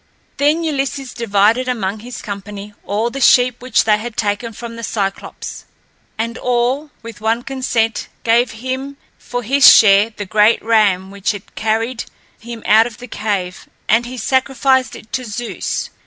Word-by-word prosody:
Then 300 +4 +2
Ulysses 275 -3 -2
divided 230 +2 +2
among 215 -4 -2
his 240 +3 -9
company 205 0 -7
all 220 +4 -1
the 275 - -5
sheep 245 -1 +4
which 255 -2 +2
they 210 -1 +3
had 230 0 -7
taken 210 +2 -1
from 230 +1 -8
the 230 - -8
Cyclops. 200 -3 -4 0.5
And 230 +1 -3
all, 250 +4 0
with 230 -2 -10
one 225 +2 0
consent, 245 -4 -1 0.2
gave 235 +1 +3
him 260 +5 -5 0.2
for 245 0 -5
his 275 +5 +7
share 205 0 +6
the 210 -2 -7
great 210 +4 +3
ram 200 -4 +2
which 200 +2 -1
had 205 -2 -11
carried 225 +2 -1 0.3
him 230 0 -9
out 220 +2 +5
of 235 - -11
the 245 - -10
cave, 200 -5 -3 0.2
and 235 +2 +3
he 255 +1 -7
sacrificed 260 0 +1
it 215 - -14
to 255 - -1
Zeus. 235 +1 -4
230 Hz, 160 wpm, -18 LUFS, 210-250 Hz, 0.5 s, his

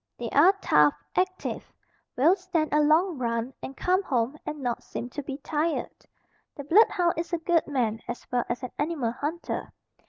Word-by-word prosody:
They 235 -2 -5
are 350 +8 +6
tough, 150 -1 +5 0.2
active, 370 0 -2 0.5
will 315 +9 +5
stand 355 -5 -2
a 300 - +4
long 310 +1 +3
run 235 +1 -2
and 270 - -7
come 370 +2 +2
home 255 -5 -1
and 300 0 -4
not 245 -3 -2
seem 245 - -6
to 290 - -4
be 275 -1 -6
tired. 310 +3 -1 0.6
The 285 - -7
blood 385 +11 +6
hound 350 -3 +1
is 340 +2 -4
a - - +3
good 335 0 +1
man 235 -6 -1
as 240 0 -6
well 245 -1 +1
as 245 +2 -3
an 255 - -5
animal 290 -6 -1
hunter. 305 +7 -4
295 Hz, 185 wpm, -27 LUFS, 245-340 Hz, 0.6 s, are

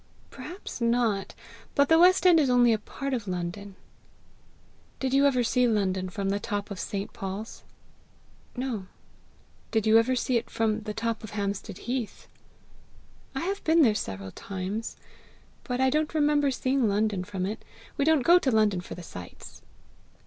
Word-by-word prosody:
"Perhaps 360 -8 -8
not; 230 -4 +1 0.4
but 280 0 +4
the 325 +2 +5
west 370 +2 +5
end 350 -3 +7
is 285 -4 +2
only 245 -2 +5
a 220 - 0
part 275 +5 -5
of 230 -5 -3
London." 185 +2 -5 1.2
"Did 265 -1 -1
you 280 +1 +5
ever 255 -3 +2
see 250 +1 +2
London 190 -4 0
from 195 +2 -3
the 200 - 0
top 205 -1 -4
of 195 - -5
St. 200 -1 -4
Paul's?" 195 +3 -6 1.0
"No." 240 -7 -3 0.8
"Did 220 -2 0
you 220 +1 +6
ever 255 +3 +1
see 250 0 +1
it 230 - -4
from 220 -1 0
the 210 0 -5
top 225 0 -2
of 215 0 -8
Hampstead 200 -1 -3
heath?" 245 -3 -4 1.1
"I 270 - -2
have 390 +4 -3
been 325 0 +5
there 225 -5 +5
several 95 - -5
times, 195 - -5 0.7
but 250 -1 -3
I 265 0 +3
don't 305 +2 0
remember 295 -1 +3
seeing 260 -1 +1
London 205 -2 0
from 190 -1 -4
it. 215 +3 -5 0.3
We - - 0
don't 310 -2 +3
go 350 +5 +6
to 275 - 0
London 215 -6 +2
for - - -8
the 180 - -9
sights." 90 - -11
225 Hz, 170 wpm, -27 LUFS, 200-265 Hz, 1.2 s, end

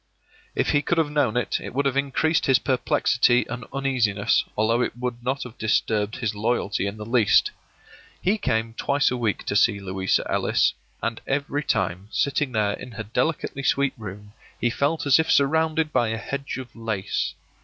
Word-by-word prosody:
If - - +1
he 145 - +3
could 170 +3 0
have 155 -3 +1
known 135 -6 +1
it, 125 - 0
it - - -8
would 140 +1 +1
have 135 -2 +1
increased 140 +4 +1
his 135 -2 +6
perplexity 125 -1 +2
and 120 -1 -6
uneasiness, 125 -7 +1
although 115 +3 +2
it 125 - -2
would 120 -1 -4
not 130 +3 -1
have 125 -1 -11
disturbed 110 -1 +1
his 115 -4 -2
loyalty 105 -2 -1
in 100 +2 -5
the 105 - -7
least. 120 - +3 0.7
He 205 +4 +1
came 110 - -1
twice 140 +4 +1
a - - 0
week 115 -4 -1
to - - -2
see 100 0 +4
Louisa 95 -1 0
Ellis, - - +2 0.3
and 115 0 -2
every 140 +1 -1
time, 95 -5 -1
sitting 140 +2 0
there 105 -3 +1
in 125 - -8
her 110 +1 -5
delicately 130 +5 -1
sweet 140 0 +1
room, 105 -1 -9 0.3
he 120 - +1
felt 145 +6 0
as 140 +1 +5
if 160 - +1
surrounded 155 +2 +2
by 120 - +3
a 110 0 -2
hedge 140 +4 -4
of 130 -2 -9
lace. 110 -4 -2
125 Hz, 185 wpm, -24 LUFS, 110-140 Hz, 0.7 s, his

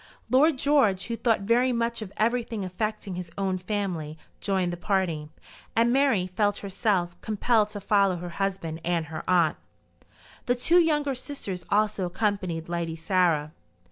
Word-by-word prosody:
Lord 285 +3 +5
George, 255 -10 +3
who 230 - -3
thought 225 -3 +1
very 240 +5 +3
much 235 -1 -1
of 200 -3 -6
everything 230 -2 0
affecting 210 +2 -3
his 180 -1 -6
own 190 -2 -1
family, 180 -6 -3 0.2
joined 185 -3 0
the - - -2
party, 175 -5 -1 0.5
and 235 +1 +3
Mary 265 -9 +3
felt 205 +2 0
herself 190 -3 0
compelled 215 0 +1
to 210 - -6
follow 200 -2 +3
her 175 0 -6
husband 185 -5 -2
and 170 -2 0
her 155 +1 -6
aunt. 170 -4 +3 0.9
The 245 - +3
two 330 +8 +4
younger 295 -4 +2
sisters 225 - -5
also 205 -2 +1
accompanied 185 -4 -2
Lady 170 -1 -3
Sarah. 165 -3 +1
195 Hz, 150 wpm, -26 LUFS, 175-230 Hz, 0.9 s, Lord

